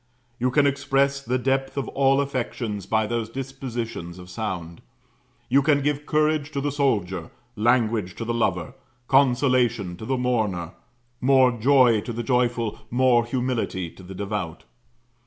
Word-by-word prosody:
You 125 +1 +2
can 140 +3 +3
express 140 0 +1
the 125 -1 -1
depth 135 +2 -1
of 140 - -1
all 135 0 +3
affections 120 -7 -3
by 110 0 +2
those 115 0 -2
dispositions 120 -8 -5
of 90 0 -11
sound: 90 -5 -5 0.7
you 140 - +4
can 140 0 +2
give 145 0 -1
courage 155 -1 +1
to 140 - -1
the 145 +1 -1
soldier, 100 - 0 0.3
language 110 -4 +1
to 115 - -5
the 120 - -1
lover, 90 -8 -1 0.3
consolation 125 -7 +2
to 110 - -8
the 130 - 0
mourner, 110 -9 -1 0.5
more 130 -1 +5
joy 120 -2 +4
to 120 - -6
the 120 +1 -3
joyful, 120 -2 0
more 120 -1 +3
humility 120 -8 -2
to - - -15
the 95 +1 -10
devout. 100 -4 -4
120 Hz, 150 wpm, -24 LUFS, 105-135 Hz, 0.7 s, more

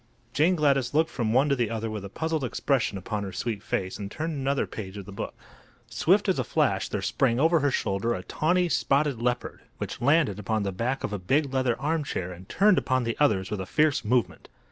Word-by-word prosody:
Jane 165 +6 +3
Gladys 140 -4 +1
looked 160 +1 +3
from 115 -3 -1
one 130 +5 +4
to 140 - +3
the 120 -4 0
other 115 0 -3
with 110 -2 -5
a 100 - -7
puzzled 160 +5 -2
expression 125 -4 0
upon 105 +2 -4
her 100 -1 -5
sweet 110 +1 -3
face, 95 -4 -3
and 100 -1 -5
turned 160 +7 -3
another 140 -1 0
page 100 -2 -7
of 100 - -7
the 105 - -10
book. 100 - -6 0.6
Swift - - +3
as - - +1
a - - +1
flash - - 0
there - - -3
sprang 120 -2 +1
over 165 +3 +4
her 145 -1 +2
shoulder 115 -1 0
a 90 - -6
tawney, 175 - +1
spotted 140 -6 +1
leopard, 125 0 -2 0.2
which - - -5
landed 140 - +3
upon 110 +1 -1
the 100 - -1
back 120 +8 -2
of - - -3
a 105 - -2
big 135 +9 +1
leather 130 -3 +1
armchair 145 - -2
and 90 +1 -12
turned 205 -1 +4
upon 130 -1 0
the 115 -1 -2
others 105 -10 +2
with 105 -2 -2
a 95 - -6
fierce 150 +1 +2
movement. 120 +2 0
125 Hz, 225 wpm, -27 LUFS, 105-145 Hz, 0.6 s, one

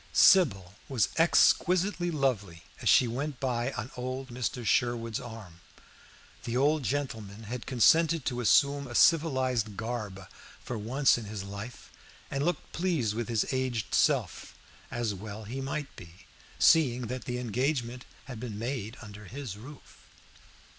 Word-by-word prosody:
Sybil 100 - +5 0.2
was 125 -6 +1
exquisitely 175 +2 +3
lovely 115 - -1 0.2
as - - +1
she 125 - +6
went 135 +3 -4
by 125 -1 -1
on 110 +5 -5
old 130 +1 -5
Mr. 120 0 -3
Sherwood's 115 -1 +1
arm. 110 -8 -10 0.8
The 120 +1 -2
old 150 +3 +3
gentleman 115 -6 -4
had 120 +3 -6
consented 160 +4 +4
to 125 0 -2
assume 140 +4 +3
a 120 - -8
civilized 130 - +3
garb 110 -5 -5 0.3
for 125 - -6
once 120 +5 +2
in 115 - -8
his 105 -2 -6
life, 100 +5 -9 0.4
and 140 0 -1
looked 175 0 -2
pleased 160 - 0
with 115 +1 -4
his 115 -3 +1
aged 130 -5 -2
self, - - +1 0.3
as 115 -3 -2
well 105 +2 -8
he 125 +6 -5
might 140 +2 -4
be, 85 +1 -14 0.3
seeing 125 -6 +4
that 125 +2 -5
the 125 0 -3
engagement 125 +1 -2 0.2
had 125 -4 -8
been 115 -3 -6
made 115 -1 -4
under 105 -1 -11
his 125 0 -7
roof. 130 +7 -13
125 Hz, 145 wpm, -29 LUFS, 110-135 Hz, 0.8 s, she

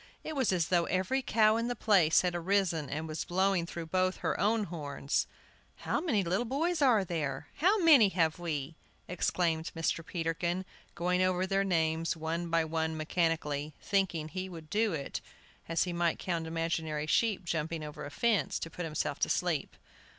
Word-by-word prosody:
It 315 - -5
was 265 -7 +2
as 170 -3 0
though 175 -2 +3
every 190 +10 0
cow 220 -3 +3
in 230 +1 -1
the 245 - -2
place 185 -8 +4
had 180 -1 0
arisen 175 -4 0
and 155 +2 -3
was 155 0 -3
blowing 190 -1 +1
through 170 -1 -6
both 185 +2 0
her - - 0
own 220 +1 +2
horns! 145 -5 -2 0.5
"How - - -2
many 235 - +1
little 185 +6 0
boys 310 +7 -1
are 235 -8 +4
there? 155 -6 -3
How 380 +7 +4
many 280 -11 +7
have 165 -3 +1
we?" 160 -2 -4 0.3
exclaimed 170 -2 0
Mr. 165 0 -1
Peterkin, 170 +2 -2 0.3
going 180 +1 +1
over 185 0 +2
their 195 +1 +1
names 165 -3 0
one 165 +2 -3
by 165 -1 +2
one 160 0 -2
mechanically, 155 -2 -1
thinking 180 -6 0
he 185 +2 -4
would 160 -3 -10
do 215 0 +2
it, 140 -3 -4 0.5
as 165 0 +2
he 180 - -3
might 170 -1 +1
count 170 -3 -2
imaginary 160 -2 -2
sheep 200 +3 +1
jumping 160 -1 -2
over 150 -1 -7
a - - -6
fence, 205 - +1
to 165 - -6
put 175 - -5
himself 155 -2 -2
to - - +1
sleep. - - -1
170 Hz, 180 wpm, -31 LUFS, 160-195 Hz, 0.5 s, many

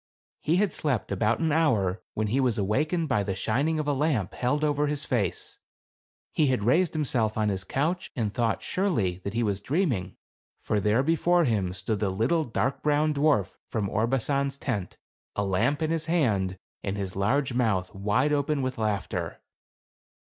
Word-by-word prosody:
He 160 - +1
had 195 -2 +2
slept 130 -11 -1
about 105 +4 +1
an 160 -1 +2
hour, 110 - +2
when 110 - 0
he 115 +6 +1
was 125 -4 +2
awakened 150 - 0
by 125 -7 +2
the 100 -1 -2
shining 140 +11 0
of 155 -1 -2
a 145 - +2
lamp 135 - 0
held 145 +5 0
over 150 0 +2
his 150 0 -2
face. 105 -9 -2 0.7
He 150 - +3
had 130 -5 +1
raised 160 - +3
himself 125 -8 0
on 105 -1 +2
his 95 -2 -2
couch 170 - -1
and 110 -4 -1
thought, 115 -3 0
surely, 115 - 0
that 100 +2 -4
he 120 - +1
was 100 -2 -1
dreaming; 125 - -1 0.4
for 105 - 0
there 105 +5 +2
before 170 +3 +3
him 100 -8 0
stood 95 +4 -3
the 105 - 0
little 120 - +1
dark 125 +3 -1
brown 150 +1 +2
dwarf 145 - +2 0.2
from 105 -2 -1
Orbasan's 135 +5 0
tent, 105 -10 -3 0.4
a 100 - 0
lamp 115 +11 +1
in 160 - 0
his 165 -1 -1
hand, 105 - +1 0.3
and 100 0 -2
his 95 -2 -4
large 125 +7 +1
mouth 105 -7 0
wide 105 +9 +1
open 145 -1 0
with 130 -2 -3
laughter. 105 -3 -2
125 Hz, 180 wpm, -27 LUFS, 100-150 Hz, 0.7 s, He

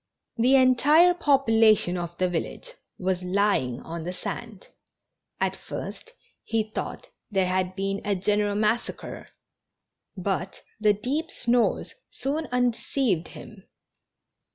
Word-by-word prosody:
The 250 +4 +4
entire 285 +7 +6
population 225 - +4
of 175 -1 -5
the 185 - +2
village 180 - -4 0.3
was 185 -1 -1
lying 180 - +1
on 165 0 -6
the 180 +2 -4
sand. 215 +2 -7 0.7
At - - 0
first 470 - -8 0.3
he 220 -1 -1
thought - - -5 0.2
there 195 -3 +1
had 185 0 -1
been 195 +1 -2
a 205 -1 0
general 205 +2 +1
massacre, 215 +3 -2 0.9
but 190 0 -3 0.2
the 210 -1 +4
deep 275 +11 -2
snores 240 0 +1 0.2
soon 305 +4 -3
undeceived 245 - 0
him. 210 -4 -12
210 Hz, 115 wpm, -26 LUFS, 185-250 Hz, 0.9 s, entire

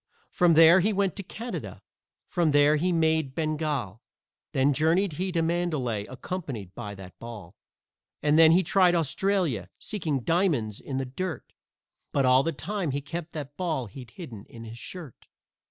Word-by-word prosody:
From 175 -3 +4
there 165 +3 +8
he 210 +4 +2
went 195 -3 0
to - - -3
Canada, 230 +5 -7 0.4
from 175 -4 +1
there 145 +1 +5
he 180 +4 +1
made 160 -4 +1
Bengal, 150 - -2 0.5
Then 135 +2 +3
journeyed 165 +5 +2
he 185 +5 -2
to 165 -2 +1
Mandalay, 155 -11 -1
accompanied 130 - -6
by 100 +2 -7
that 95 -1 -12
ball. 105 -7 -9 0.7
And 150 0 +3
then 160 0 +8
he 180 +3 +5
tried 180 0 +4
Australia, 165 - 0
seeking 160 - -2
diamonds 150 - +1
in 135 - -5
the 135 - -1
dirt, 160 +3 -5 0.6
But 140 -2 +2
all 130 +1 +6
the 165 - -1
time 180 +3 -3
he 140 +1 -2
kept 165 +3 -6
that 145 -2 -6
ball 160 -8 -1
he'd 120 +3 -11
hidden 115 - -10
in 115 -1 -11
his 115 +1 -9
shirt. 155 - -9
155 Hz, 165 wpm, -27 LUFS, 130-175 Hz, 0.7 s, there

